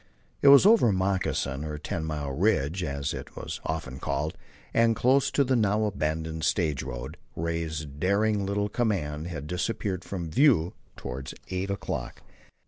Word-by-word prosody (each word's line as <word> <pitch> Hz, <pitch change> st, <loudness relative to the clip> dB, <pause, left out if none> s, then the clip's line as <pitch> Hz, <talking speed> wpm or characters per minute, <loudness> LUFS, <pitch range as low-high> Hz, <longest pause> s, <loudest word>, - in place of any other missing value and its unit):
It -, -, +4 dB
was 140 Hz, +4 st, +9 dB
over 210 Hz, -, +6 dB
Moccasin, 95 Hz, -7 st, 0 dB
or 75 Hz, -1 st, -4 dB
Ten 80 Hz, +2 st, -4 dB
Mile, 75 Hz, -3 st, -3 dB
Ridge, 90 Hz, 0 st, +1 dB
as 70 Hz, -3 st, -2 dB
it -, -, -8 dB
was -, -, -6 dB
often 70 Hz, -5 st, -4 dB
called, 75 Hz, +3 st, -2 dB, 0.4 s
and 115 Hz, 0 st, +4 dB
close 130 Hz, +4 st, +3 dB
to 140 Hz, -, +2 dB
the 130 Hz, 0 st, +1 dB
now 110 Hz, -1 st, +2 dB
abandoned 80 Hz, -4 st, -2 dB
stage 75 Hz, -8 st, +1 dB
road, 65 Hz, -1 st, -6 dB, 0.2 s
Ray's 80 Hz, -2 st, -2 dB
daring 100 Hz, +8 st, +1 dB
little 100 Hz, +1 st, 0 dB
command 85 Hz, -10 st, -1 dB
had 80 Hz, -5 st, -5 dB
disappeared 95 Hz, +2 st, -2 dB
from 85 Hz, -5 st, -5 dB
view 115 Hz, -, +4 dB, 0.2 s
toward 65 Hz, +1 st, -6 dB, 0.2 s
eight 95 Hz, +1 st, -2 dB
o'clock. 100 Hz, -, -4 dB
85 Hz, 150 wpm, -27 LUFS, 75-105 Hz, 0.4 s, was